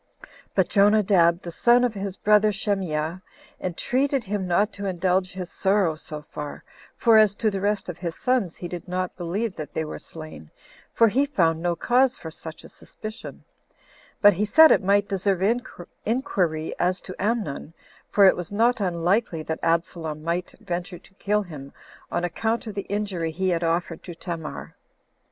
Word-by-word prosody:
But - - +3
Jonadab, 200 -4 +4
the 170 - -6
son 240 +7 +4
of 245 -3 +1
his 195 -2 -4
brother 210 0 +4
Shemeah, 185 -5 -2 0.4
entreated 260 - 0
him 200 -2 -3
not 200 +5 +2
to 200 0 -5
indulge 185 +1 0
his 185 -1 -6
sorrow 190 -4 +2
so 155 -1 -7
far, 150 -1 -7 0.3
for 225 -2 +5
as 210 -2 +4
to 215 0 +1
the 195 -1 -3
rest 205 +1 0
of 180 - -6
his 170 -2 -4
sons 250 -9 0
he 175 - -6
did 175 +1 -7
not 180 0 -3
believe 190 +4 -3
that 150 -2 -7
they 160 - -1
were - - -6
slain, 155 - -10 0.4
for 230 - +5
he 270 +7 +2
found 165 - +1
no 175 0 0
cause 255 +6 +2
for 160 - -8
such 160 0 -9
a - - -12
suspicion; 215 +1 -10 0.8
but 205 0 +9
he 190 +4 -1
said 315 +10 +7
it - - +4
might 200 +1 +3
deserve 195 -1 0 0.6
inquiry 185 - -1
as 180 +1 +1
to 185 - -8
Amnon, 205 -9 -2 0.4
for 200 - +5
it 190 - +6
was 180 0 -6
not 230 +3 +2
unlikely 175 -1 0
that 160 +1 -4
Absalom 165 -2 -1
might 170 +2 -2
venture 180 -3 -4
to 195 - -20
kill 210 +2 0
him 145 -6 -10 0.4
on 175 - -1
account 220 +7 -1
of 215 - -6
the 200 0 -5
injury 200 -5 -2
he 185 +4 -1
had 170 -1 0
offered 165 0 -1
to 175 - -8
Tamar. 165 -2 -6
185 Hz, 175 wpm, -24 LUFS, 170-210 Hz, 0.8 s, but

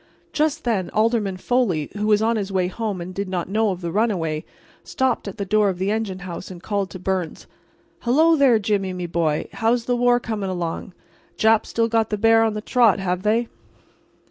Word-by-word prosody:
Just 310 +1 0
then 215 -7 0
Alderman 215 -3 +1
Foley, 185 - 0
who 210 0 -2
was 210 0 +3
on 230 +1 +2
his 200 -2 -3
way 185 -2 +1
home 205 -2 -4
and 180 +2 -7
did 200 0 -4
not 180 -2 -2
know 220 +1 +2
of 185 -2 -4
the 170 -1 -3
runaway, 170 -7 0 0.4
stopped 260 -4 -1
at 200 - -7
the 200 - -3
door 210 +1 +3
of 185 - -3
the 190 +3 -1
engine 215 -4 -2
house 175 0 -7
and 180 -1 -10
called 200 -2 -2
to - - -8
Byrnes: 185 -2 -3 0.5
"Hello 315 +7 +4
there, 270 -6 +5
Jimmy, 200 -3 -1
me 180 -1 -4
boy—how's 170 +8 0
the 245 - +1
war 245 0 +3
coming 215 -5 -3
along? 175 +1 -4 0.4
Japs 220 0 +3
still 230 0 +1
got 225 -1 +1
the 210 - -1
bear 225 +2 +5
on 220 -1 +1
the 210 - -3
trot, 235 -3 +3
have 180 -2 -2
they?" 225 +3 +1
210 Hz, 200 wpm, -22 LUFS, 185-230 Hz, 0.5 s, there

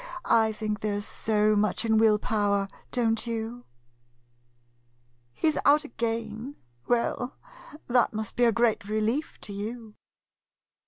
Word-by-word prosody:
I 220 -1 +4
think 215 -1 -3
there 205 -1 -1
's 205 - -3
so 215 -1 +2
much 210 +3 +1
in 220 -1 +3
will 220 -1 +5
power, 205 -2 0 0.2
don't 225 -2 0
you? 230 +1 -4 1.7
He 125 - -1
's 300 - -3
out 295 +2 +5
again? 230 0 -4 0.3
Well, 245 +1 0 0.5
that 245 -1 +3
must 215 -1 -5
be 245 - +3
a 230 - +5
great 225 -3 +1
relief 220 +8 -1
to 205 - -7
you. 220 +2 -6
225 Hz, 130 wpm, -27 LUFS, 210-235 Hz, 1.7 s, will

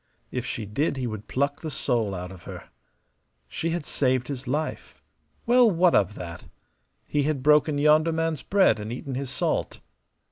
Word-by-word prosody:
If - - -3
she 110 - -4
did 135 +8 -1
he 130 - -2
would 110 -3 -5
pluck 140 +2 -1
the 160 - -4
soul 115 -7 -1
out 90 0 -6
of 90 -3 -12
her. - - -9 0.8
She 165 - -3
had 170 -3 -2
saved 130 -2 0
his 135 -2 -5
life. 150 +5 -3 0.5
Well, 245 -1 +6
what 180 -2 +3
of 100 +1 +2
that? 85 -2 -8 0.6
He 145 - 0
had 140 -2 -1
broken 150 0 +4
yonder 155 +2 +4
man's 165 -3 -1
bread 195 - +3
and 105 +2 -5
eaten 130 +2 -5
his 135 0 -3
salt. 130 - -1
140 Hz, 175 wpm, -26 LUFS, 115-155 Hz, 0.8 s, Well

